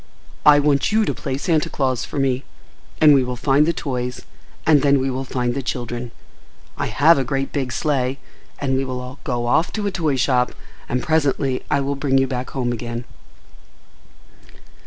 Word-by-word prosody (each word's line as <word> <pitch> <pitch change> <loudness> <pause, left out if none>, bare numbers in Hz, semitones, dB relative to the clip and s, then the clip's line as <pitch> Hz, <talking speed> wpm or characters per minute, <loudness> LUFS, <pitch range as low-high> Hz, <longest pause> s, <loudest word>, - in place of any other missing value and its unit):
I 145 -1 +9
want 145 +2 +2
you 220 0 +3
to - - -1
play 135 -3 -4
Santa 155 0 0
Claus 130 -3 -1
for - - -7
me, 135 -1 +1 0.6
and 150 -1 +7
we 135 -2 +4
will 125 0 -3
find 135 +4 +2
the - - +3
toys, 125 -6 -4 0.4
and 150 -3 +5
then 140 -1 +4
we 135 0 0
will 130 +1 -3
find 125 -2 -2
the 140 - -2
children. 120 -2 -4 0.7
I - - -2
have 140 +8 +4
a - - +1
great 135 +1 -2
big 135 -4 -2
sleigh, 135 -1 0 0.4
and 135 -2 -1
we 135 - +1
will 130 0 -6
go 120 -3 -2
off 160 +8 +2
to 210 -2 -2
a 200 - 0
toy 160 -7 0
shop, 125 -1 +1 0.4
and 125 +1 -1
presently 140 -4 +1
I 145 -2 +2
will 140 +1 -1
bring 140 -1 +1
you 135 - +4
back 130 -1 -4
home 125 -3 -2
again." 120 0 -5
135 Hz, 185 wpm, -21 LUFS, 125-145 Hz, 0.7 s, I